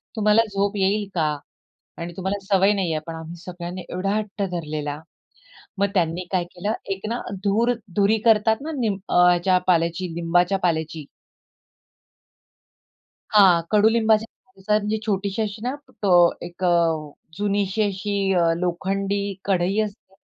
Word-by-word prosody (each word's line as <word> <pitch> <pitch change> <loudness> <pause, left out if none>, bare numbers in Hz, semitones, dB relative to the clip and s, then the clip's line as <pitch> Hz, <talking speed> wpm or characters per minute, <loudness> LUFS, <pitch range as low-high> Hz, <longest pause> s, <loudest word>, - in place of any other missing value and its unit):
तुम्हाला 215 0 +4
झोप 200 +1 0
येईल 200 +1 +1
का? 155 -3 +2 0.7
आणि 170 +1 -5
तुम्हाला 190 +2 -2
सवय 195 0 +4
नाही 190 -5 -1
आहे." 155 - -1
पण, 165 - -6
आम्ही 160 +1 -8
सगळ्यांनी 180 +1 -7
एवढा 195 +3 -1
हट्ट 210 -1 -3
धरलेला. 150 -3 -4 0.8
मग 200 - +3
त्यांनी 175 -1 0
काय 180 -2 +1
केलं 205 +4 -2 0.2
एक 195 +2 -8
ना, 235 - -2 0.2
धूर 225 +5 +2 0.2
धुरी 205 +2 +3
करतात 220 0 +4
ना, 320 +2 -4
निम 215 -5 0
ह्याच्या 180 +1 +4
पाल्याची, 170 0 +1
लिंबाच्या 175 +3 +2
पाल्याची. 160 -3 -1 2.3
हां, 190 -5 +6
कडूलिंबाच्या 220 +1 +4 0.2
पाल्याची. 210 -4 -4
म्हणजे 215 +1 -1
छोटीशी 200 0 -1
अशी 215 0 -4
ना, 255 - -1 0.3
अ, 200 - +2 0.4
एक 175 +2 -9
अ, 175 - +4 0.6
जुनीशी 205 0 0
अशी 200 +1 -3 0.2
अ, 170 -2 +3
लोखंडी 195 +3 -1 0.2
कढई 190 0 +1
असते 205 -2 -7
195 Hz, 135 wpm, -23 LUFS, 175-210 Hz, 2.3 s, हां